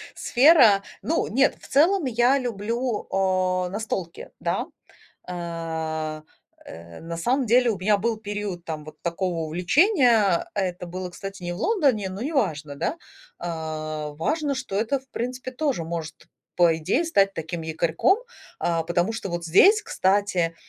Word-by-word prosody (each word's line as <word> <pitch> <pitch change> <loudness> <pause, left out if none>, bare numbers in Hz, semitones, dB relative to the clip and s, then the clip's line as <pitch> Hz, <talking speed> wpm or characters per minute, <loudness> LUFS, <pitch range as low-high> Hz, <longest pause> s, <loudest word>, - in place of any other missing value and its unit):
сфера. 245 -7 +6 0.2
Ну, 325 - 0
нет, 270 +5 +2
в - - -14
целом 330 +4 +3
я 245 +3 +3
люблю, 235 0 -2
а, 185 -1 +1
настолки, 195 -4 -5
да. - - -1 0.6
Э, 160 -3 -4 0.4
э, 85 +1 -11
на 165 0 -6
самом 250 +9 0
деле 240 +2 +4
у 205 - -2
меня 205 +3 +3
был 225 +2 -1
период, 205 -4 -5
там, 155 -3 -5
вот 155 0 -13
такого 170 0 -2
увлечения. 210 - +3
Это 180 -3 -2
было, 180 +1 -6
кстати, 195 +1 -8
не 175 - -2
в 175 - -6
Лондоне, 270 - +1
но 190 +4 -6
неважно, 155 - -1
да. 295 - -2 0.4
А, 155 -2 -4
важно, 290 - -1
что 255 -7 -4
это, 230 +6 +1
в 265 - -23
принципе, 250 +2 -4
тоже 255 - -1
может, 160 -2 -5 0.4
по 170 -2 +4
идее, 180 - 0
стать 200 -11 +3
таким 165 0 -5
якорьком, 160 - +1 0.4
а, 165 -1 0
потому 175 +5 0
что 195 -4 -5
вот 175 0 -3
здесь, 385 - +6
кстати, 190 -3 +1
190 Hz, 150 wpm, -24 LUFS, 165-245 Hz, 0.6 s, сфера